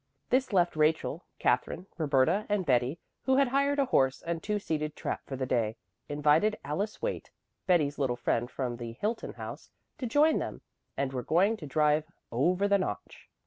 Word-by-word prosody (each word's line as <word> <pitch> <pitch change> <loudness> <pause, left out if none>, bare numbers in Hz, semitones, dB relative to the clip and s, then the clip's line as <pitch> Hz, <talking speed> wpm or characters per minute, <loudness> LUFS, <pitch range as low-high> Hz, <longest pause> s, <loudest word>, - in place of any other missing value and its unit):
This 260 0 +2
left 175 -4 +3
Rachel, 155 +1 +1
Katherine, 125 +8 0
Roberta 155 +5 +2
and 205 -3 +1
Betty, 130 +2 +2 0.3
who 265 - +4
had 275 -1 +4
hired 280 +2 +2
a 280 - +3
horse 135 - +2
and 165 -1 -3
two 210 +3 -1
seated 155 -6 -2
trap - - -3
for 135 - -4
the 130 0 -2
day, 115 -3 0 0.3
invited 150 +8 +3
Alice 200 - -3
Waite, - - -3 0.4
Betty's 150 -6 +2
little 130 -3 +1
friend 120 0 0
from 125 -2 -3
the 115 -1 -6
Hilton 215 - -3
House, - - -8 0.3
to 255 - -2
join 295 +6 +4
them, - - -5 0.4
and 135 -1 -1
were 125 - -2
going 185 - +3
to 155 - -8
drive 150 +1 +2 0.3
"over 180 +11 +2
the 200 0 +4
notch." 105 - -5
155 Hz, 180 wpm, -30 LUFS, 135-205 Hz, 0.4 s, who